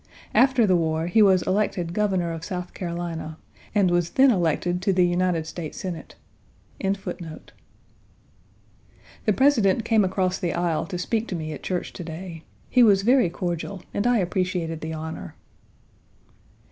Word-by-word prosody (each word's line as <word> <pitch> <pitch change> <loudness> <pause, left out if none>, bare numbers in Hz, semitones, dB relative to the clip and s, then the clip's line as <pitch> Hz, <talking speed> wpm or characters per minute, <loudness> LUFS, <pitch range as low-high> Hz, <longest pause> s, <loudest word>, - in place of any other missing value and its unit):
After 260 -3 +5
the 185 -3 +3
war, 160 -1 0
he 195 +6 +3
was 190 -3 +5
elected 185 -4 0
Governor 190 -4 0
of 165 0 -6
South 180 -1 -5
Carolina 170 -3 -5 0.4
and 195 -4 +4
was 175 -1 +1
then 265 +5 +5
elected 175 -1 0
to 195 - +2
the 180 -1 +4
United 175 -2 +1
States 160 -1 -7
Senate. 175 -4 -6 0.6
Page 195 0 0
48 165 -5 -8 1.7
The 215 - +3
President 230 -5 +3
came 225 -2 +4
across 185 0 0
the 175 - -1
aisle 170 -2 0
to 185 - -4
speak 220 +5 -1
to 185 - -3
me 155 -2 -4
at 145 - -8
church 180 -2 -3
to 175 - -7
day. 165 0 -7 0.3
He 250 - +3
was 200 -4 +5
very 245 -4 +4
cordial, 175 +2 -4
and 205 +4 0
I 245 -1 +4
appreciated 180 -4 -1
the 160 0 -4
honor. 160 0 -6
180 Hz, 160 wpm, -24 LUFS, 170-200 Hz, 1.7 s, After